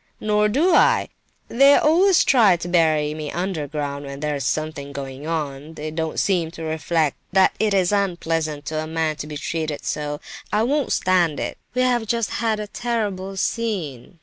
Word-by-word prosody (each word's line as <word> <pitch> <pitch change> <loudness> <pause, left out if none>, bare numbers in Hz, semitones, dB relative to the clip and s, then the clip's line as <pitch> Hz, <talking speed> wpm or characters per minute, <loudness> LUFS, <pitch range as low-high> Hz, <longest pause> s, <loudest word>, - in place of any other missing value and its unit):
"Nor 210 0 +2
do 315 - +2
I! - - +4 0.4
They 275 +4 +6
always 355 +4 +4
try 220 -9 +5
to 170 - -6
bury 155 -4 +2
me 155 -1 -5
underground 150 -5 -3
when 140 0 -7
there's 145 -4 -1
anything 155 -2 -6
going 135 +1 -7
on; 150 -1 -4
they 155 +1 -5
don't 160 0 -2
seem 175 -5 +1
to 165 - -6
reflect 160 -1 0 0.2
that 190 0 +5
it 210 -2 +2
is 185 -1 +2
unpleasant 165 -6 -1
to 155 +2 -3
a 155 - -5
man 160 -1 -1
to 150 - -6
be 150 -1 -6
treated 155 0 -3
so! 150 -1 -3 0.3
I 210 +1 +2
won't 285 +3 0
stand 175 -5 +2
it! - - -4 0.2
We 255 - +2
have 240 -3 +1
just 230 -1 0
had 220 -2 0
a 210 - -3
terrible 205 -4 -3
scene! 185 - -3
165 Hz, 175 wpm, -22 LUFS, 150-210 Hz, 0.4 s, They